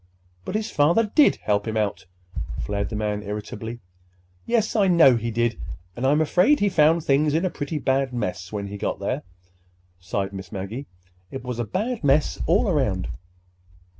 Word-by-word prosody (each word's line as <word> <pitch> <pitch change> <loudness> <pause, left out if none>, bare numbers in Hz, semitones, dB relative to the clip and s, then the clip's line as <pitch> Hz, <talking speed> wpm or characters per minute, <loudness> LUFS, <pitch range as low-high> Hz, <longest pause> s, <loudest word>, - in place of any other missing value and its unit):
"But - - -4
his 215 0 -2
father 175 +9 +3
did 300 - +6
help 105 0 0
him 110 0 -2
out!" 105 -3 -2 0.5
flared 100 -1 -2
the - - -5
man 105 -1 -1
irritably. 105 +3 -6 0.7
"Yes, 230 -2 +1
I 205 -3 +4
know 170 -8 +6
he 115 0 -2
did; 120 +1 -1 0.3
and 130 +2 0
I'm 150 +3 +3
afraid 185 - +4
he 205 - +3
found 160 -1 +4
things 145 +2 +2
in 165 +4 +1
a 185 - 0
pretty 145 +2 -4
bad 135 -1 +1
mess—when 100 -3 -4
he 100 0 -7
got - - -2
there," - - -2 0.8
sighed 95 +2 -3
Miss 95 -2 -8
Maggie. 105 +8 -5 0.4
"It 135 - -7
was 125 -2 -4
a 120 - 0
bad 215 - -2
mess 145 +2 +2
all 190 +8 +3
around." 130 - 0
130 Hz, 170 wpm, -24 LUFS, 105-165 Hz, 0.8 s, did